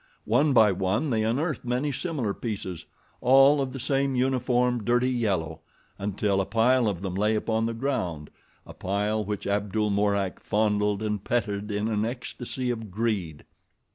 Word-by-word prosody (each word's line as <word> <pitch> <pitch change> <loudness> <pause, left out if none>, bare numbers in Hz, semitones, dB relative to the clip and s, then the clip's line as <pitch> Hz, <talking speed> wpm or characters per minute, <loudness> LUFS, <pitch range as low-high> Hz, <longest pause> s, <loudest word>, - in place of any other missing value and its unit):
One 140 +7 +3
by 110 -5 +6
one 95 - 0
they 110 -2 +1
unearthed 140 +8 -1
many 125 +4 -1
similar 135 - -2
pieces, 100 -7 -5 0.3
all 135 +3 +6
of 135 -1 -2
the 135 - -6
same 135 +1 0
uniform, 125 -2 +1
dirty 120 +3 +2
yellow, 95 -10 -1 0.4
until 100 0 0
a - - -2
pile 115 +3 +3
of 95 -3 -2
them 95 -2 -3
lay 105 +3 +1
upon 110 +1 0
the 115 - -3
ground, 110 - -3 0.3
a - - -11
pile 105 +3 -1
which 105 -1 -4
Abdul 105 +1 0
Mourak 100 -2 0
fondled 105 -1 +1
and 105 -2 -2
petted 105 -3 -1
in 105 +1 -1
an 105 -1 0
ecstasy 125 +1 -4
of 115 -3 -5
greed. 95 -7 -2
110 Hz, 160 wpm, -26 LUFS, 100-125 Hz, 0.4 s, by